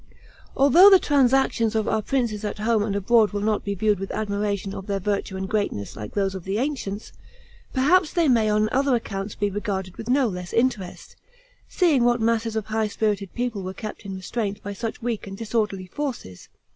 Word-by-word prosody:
Although 310 +9 +8
the 390 - +8
transactions 265 -7 +2
of 220 -1 0
our 220 - +1
princes 230 -3 -1
at 210 - -3
home 220 +1 +1
and 205 -1 -1
abroad 215 +2 +3
will 205 - -2
not 215 0 0
be 200 0 -3
viewed 210 0 +1
with 195 - -5
admiration 200 -2 -2
of 190 - -7
their 200 -1 -1
virtue 195 0 -2
and 190 0 -3
greatness 200 - -2
like 105 0 -8
those 195 -1 0
of 190 -2 -7
the 195 +3 -2
ancients, 235 -6 -3 0.6
perhaps 300 +5 +3
they 340 -3 +2
may 230 -5 +3
on 215 0 +2
other 270 0 +2
accounts 200 -3 -4
be 205 -1 -1
regarded 190 -2 -4
with 225 +1 -7
no 265 0 +3
less 180 -3 -6
interest, 230 -6 -1 0.5
seeing 315 -9 +2
what 240 0 +3
masses 225 0 0
of 220 -2 -2
high 220 0 -1
spirited 205 -2 -1
people 240 -4 -2
were 185 0 -6
kept 215 -1 -7
in 195 -1 -6
restraint 200 +2 -3
by 205 - -5
such 225 +3 -5
weak 230 -4 -3
and 195 0 -7
disorderly 215 -4 -2
forces. 200 - -6
215 Hz, 195 wpm, -24 LUFS, 200-240 Hz, 0.6 s, Although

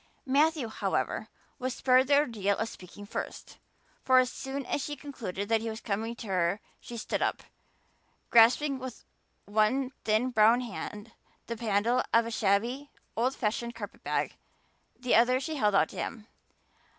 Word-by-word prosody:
Matthew, 290 0 +2
however, 220 - -2 0.3
was 255 0 -2
spared 255 0 +4
the 285 0 +5
ordeal 215 -8 +1
of 225 - -1
speaking 195 +2 -11
first, 205 - -6 0.4
for 260 0 +5
as 255 0 +4
soon 270 0 -5
as 275 - -1
she 295 - -4
concluded 225 -9 -5
that 225 -1 +3
he 225 - -3
was 220 0 -5
coming 225 +2 -3
to 235 - -9
her 185 +1 +1 0.2
she 240 - -8
stood 220 - -2
up, - - 0 0.9
grasping 260 +5 +5
with 260 -2 -8 0.4
one 220 +6 +1
thin 220 +4 +2
brown 225 +2 +5
hand 215 -1 -7 0.3
the 235 - -4
handle 230 +2 +1
of 230 0 +5
a 230 - -4
shabby, 230 +7 0 0.3
old 250 +4 +1
fashioned 235 +1 -2
carpet - - -8
bag; - - -1 0.7
the 250 -1 0
other 245 +3 +5
she 310 +3 -4
held 210 -5 +2
out 160 -5 +4
to - - -11
him. 215 -2 -4
235 Hz, 165 wpm, -29 LUFS, 215-260 Hz, 0.9 s, the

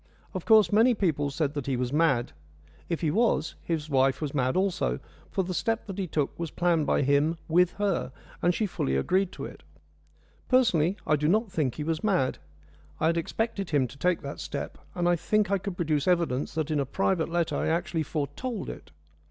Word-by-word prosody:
Of 185 - -5
course, 220 -2 +6
many 230 +3 +5
people 155 -8 0
said 145 0 -1
that 145 -3 -4
he 135 -2 0
was 125 +1 -2
mad. 145 - +2 0.6
If 170 - -2
he 160 -3 +1
was, 190 -6 +1
his 160 -3 -2
wife 135 -2 +2
was 150 -3 -3
mad 130 +1 +1
also, 185 - 0 0.3
for 190 - 0
the 185 +1 -4
step 225 +5 -1
that 195 -1 -6
he 190 - -1
took 150 -2 -2
was 170 -1 -2
planned 170 -2 +1
by - - +2
him 145 +4 +2
with 175 +2 +3
her, 200 -9 -1 0.3
and 175 - +4
she 215 +5 0
fully 65 - -1
agreed 185 - +1
to - - -6
it. - - -10 0.9
Personally, 200 -9 +3
I 155 - +3
do 150 +1 0
not 215 +4 +2
think 145 -9 0
he 150 - -4
was 160 +1 -2
mad. 185 -11 +1 0.6
I - - +1
had 165 +1 +3
expected 200 +3 -2
him 140 -4 +2
to 140 - -13
take 180 -2 +1
that 140 - -6
step, - - -5 0.2
and 175 -1 0
I 175 - +4
think 210 +4 +1
I 200 - +2
could 190 -1 -5
produce 155 -3 0
evidence 170 -8 +1
that 160 -1 -1
in 150 - +1
a 140 - +1
private 185 +2 0
letter 170 -1 0
I - - 0
actually 165 0 0
foretold 170 - -3
it. - - -12
165 Hz, 210 wpm, -27 LUFS, 145-190 Hz, 0.9 s, course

